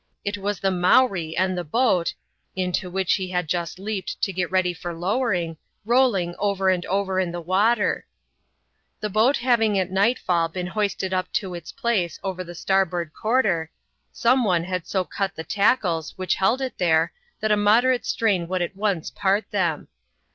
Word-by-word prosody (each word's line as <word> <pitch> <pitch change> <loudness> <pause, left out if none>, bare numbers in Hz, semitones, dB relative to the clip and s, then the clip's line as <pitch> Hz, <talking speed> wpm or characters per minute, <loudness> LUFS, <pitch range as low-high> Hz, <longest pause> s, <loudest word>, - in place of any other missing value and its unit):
It 200 0 -1
was 200 0 -2
the 195 - +1
Mowree 180 -2 +3
and 185 +1 +1
the 175 - -2
boat 185 - +1 0.2
— - - -48
into 180 +1 -2
which 190 0 +1
he 190 -2 -4
had 180 -2 -1
just 170 +1 -2
leaped 195 -1 -4
to 195 - +1
get 180 -1 -1
ready 185 -1 +1
for 175 0 -6
lowering 180 -3 -1
— - - -48
rolling 230 -8 +2
over 195 -2 +1
and 180 -1 0
over 190 0 0
in 180 -2 0
the 175 - -4
water. 205 +6 +1 0.9
The 210 - -3
boat 225 +7 +3
having 230 -4 +2
at 185 -1 -1
nightfall 190 -5 +2
been 180 +2 -4
hoisted 195 -1 -2
up 185 0 -1
to 190 -5 -1
its 170 -2 -7
place 195 -9 -1
over 185 -2 -3
the 175 0 -10
starboard 175 -3 0
quarter, 210 -9 +1 0.4
some 250 +2 +2
one 180 -6 +2
had 180 -1 -4
so 190 -2 0
cut 195 0 -3
the 160 - -5
tackles 190 -5 +1
which 185 -1 0
held 225 +8 +1
it 260 -1 -4
therei, 160 -3 +3 0.3
that 215 -1 0
a - - +6
moderate 235 +5 +3
strain 210 -6 +1
n?o\M - - -14
«i1 175 +2 -3 0.4
oti^i.^ 200 +2 +1
^^a\. 175 -6 0
ihew. - - -34
190 Hz, 185 wpm, -24 LUFS, 175-210 Hz, 0.9 s, a